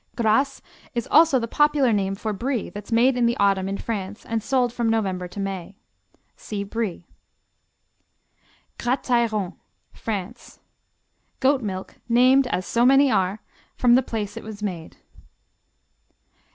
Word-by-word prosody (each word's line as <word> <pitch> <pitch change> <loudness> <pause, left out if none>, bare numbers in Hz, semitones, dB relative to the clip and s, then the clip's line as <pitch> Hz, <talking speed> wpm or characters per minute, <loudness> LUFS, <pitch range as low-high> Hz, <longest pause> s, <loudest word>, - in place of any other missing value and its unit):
Gras 255 +5 +1 0.3
is 235 - -2
also 315 -3 +6
the 230 -2 -2
popular 295 -2 +3
name 195 -1 0
for 215 +2 -3
Brie 240 +2 -3
that's 205 +2 -9
made 245 +3 +4
in 240 -1 +2
the 235 - 0
autumn 195 -1 +2
in 195 - -3
France 205 -3 -5
and 225 -1 -2
sold 250 0 +1
from 235 -2 0
November 190 -5 -1
to 180 - -9
May. 195 -1 -5 0.6
(See 205 -2 -5
Brie.) 200 -4 -4 1.7
Gratairon 235 -6 0 0.4
France 200 -4 -6 0.8
Goat 270 0 +3
milk 190 -4 -6
named, 255 +3 +5
as 185 -7 -2
so 235 - +1
many 270 +2 +5
are, 190 +1 0 0.3
from 245 -1 +4
the 255 - +6
place 215 -4 -4
it 230 - -7
is 215 -1 -8
made. 175 -5 -5
225 Hz, 140 wpm, -23 LUFS, 200-250 Hz, 1.7 s, also